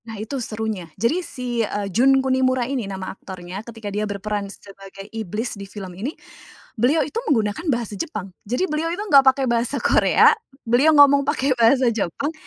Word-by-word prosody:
Nah 220 -1 -7
itu 230 +6 -4
serunya, 215 -6 -4
jadi 265 +11 +1
si, 250 -8 -3
eee, 205 -2 -2
Jun 265 +4 +4
Kunimura 260 -1 +1
ini 250 -5 -3
nama 190 -1 -5
aktornya 185 0 -8
ketika 220 -3 -8
dia 210 0 -2
berperan 205 0 -3
sebagai 195 -1 -12
iblis 220 +2 -4
di 200 -2 -9
film 195 -3 -8
ini, 230 - -5 0.6
beliau 270 +6 +2
itu 300 - -7
menggunakan 220 - 0
bahasa 235 -5 -1
Jepang, 195 - -5
jadi 250 - 0
beliau 320 -1 -2
itu 345 - -3
enggak 285 -9 +7
pakai 265 0 +3
bahasa 240 +3 0
Korea, - - +5 0.3
beliau 270 +7 +4
ngomong 280 -1 +7
pakai 280 -1 0
bahasa 240 0 +3
Jepang, 230 - -2
235 Hz, 175 wpm, -22 LUFS, 205-270 Hz, 0.6 s, enggak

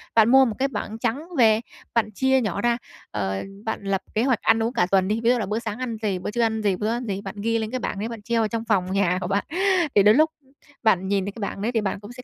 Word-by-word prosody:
bạn 225 0 +6
mua 265 0 +7
một 220 -3 -2
cái 275 - +2
bảng 220 -3 -5
trắng 255 +8 -2
về, 220 -2 +5 0.3
bạn 215 -2 +1
chia 265 +4 +2
nhỏ 200 -3 -2
ra, 240 +1 +2 0.3
ờ, 95 -2 -2 0.2
bạn 220 -2 -3
lập 195 -1 -1
kế 220 - +1
hoạch 255 -4 +1
ăn 225 0 +3
uống 235 +3 -1
cả 180 -8 +2
tuần 190 -1 +3
đi, 220 +2 0
ví 235 - +4
dụ 250 - +4
là 210 - -1
bữa 210 +3 -2
sáng 220 0 -5
ăn 235 -3 -3
gì, 195 -4 -1
bữa 190 - -4
trưa 235 - -1
ăn 220 -1 +1
gì, 200 -3 +1
bữa 210 +4 -2
ăn 240 +2 -2
gì, 200 -2 -3
bạn 195 +1 -7
ghi 230 +1 +1
lên 220 +1 -3
cái 255 - -2
bảng 200 - -3
đấy 225 +3 -3
bạn 230 -3 -7
treo 230 +1 0
ở 220 - +1
trong 230 +1 -4
phòng 190 -4 +1
nhà 185 -2 +2
của 180 - -2
bạn. 200 +1 0 0.5
Thì 200 - +6
đến 210 +2 +6
lúc 315 +1 +5 0.5
bạn 190 -4 +3
nhìn 195 -1 0
thấy 200 - -3
cái 220 - -11
bảng 200 0 -4
đấy 230 +4 0
thì 225 -3 +1
bạn 195 -1 -2
cũng 205 +2 -11
sẽ 250 - -11
220 Hz, 305 wpm, -24 LUFS, 200-235 Hz, 0.5 s, mua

